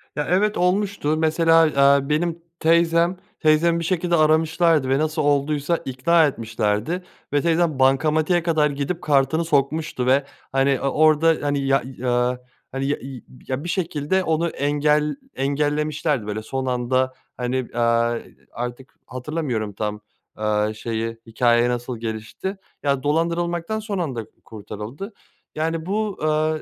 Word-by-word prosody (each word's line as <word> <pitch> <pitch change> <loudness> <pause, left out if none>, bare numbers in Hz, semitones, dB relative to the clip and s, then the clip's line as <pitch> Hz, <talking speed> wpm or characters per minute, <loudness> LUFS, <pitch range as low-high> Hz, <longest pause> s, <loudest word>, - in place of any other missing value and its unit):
Ya, 150 - -2
evet 205 +4 +2
olmuştu. 180 -4 +1
Mesela, 165 +1 +4
eee, 140 -1 +3
benim 165 +2 0 0.2
teyzem. 170 +2 +3 0.2
Teyzemi 165 +2 +3
bir - - -3
şekilde 175 0 +1
aramışlardı 160 -2 +3
ve 135 +2 +2
nasıl 155 +1 0
olduysa 145 +2 +1
ikna 160 +6 +3
etmişlerdi 115 - -2 0.3
ve 145 - +3
teyzem 165 -3 +1
bankamatiğe 155 +6 +3
kadar 155 -3 +2
gidip 145 +5 -3
kartını 145 +3 +2
sokmuştu 145 -3 0
ve, 135 +2 +3 0.3
hani, 135 0 +2
o 140 - 0
orda, 155 +3 +4
hani, 145 -1 0
ya 135 0 +3
eee, 125 -1 -1 0.3
hani, 135 +1 -3
ya 145 - 0
iii, 130 -1 -9 0.2
ya, 130 +2 -3
bir 175 - -5
şekilde 170 0 0
onu 165 +1 0
engel 150 +1 +1 0.2
engellemişlerdi, 145 -2 -1
böyle, 105 +1 -3
son 130 +4 -4
anda, 130 +1 0 0.2
hani, 125 +1 -2 0.2
eee, 115 0 0 0.2
artık 125 +2 -6
hatırlamıyorum 125 -6 -3
tam, 105 +1 -4 0.3
aaa, 105 0 0
şeyi, 115 +1 -4
hikâye 120 +1 +2
nasıl 120 0 -3
gelişti. 115 - -5 0.3
Ya, 140 -2 0
dolandırılmaktan 170 +5 0
son 210 -2 -4
anda 130 -9 -3 0.2
kurtarıldı. 110 - -8 0.4
Yani, 160 +1 -2
bu, 210 +1 -2
eee, 155 0 +1
145 Hz, 135 wpm, -22 LUFS, 130-165 Hz, 0.4 s, Mesela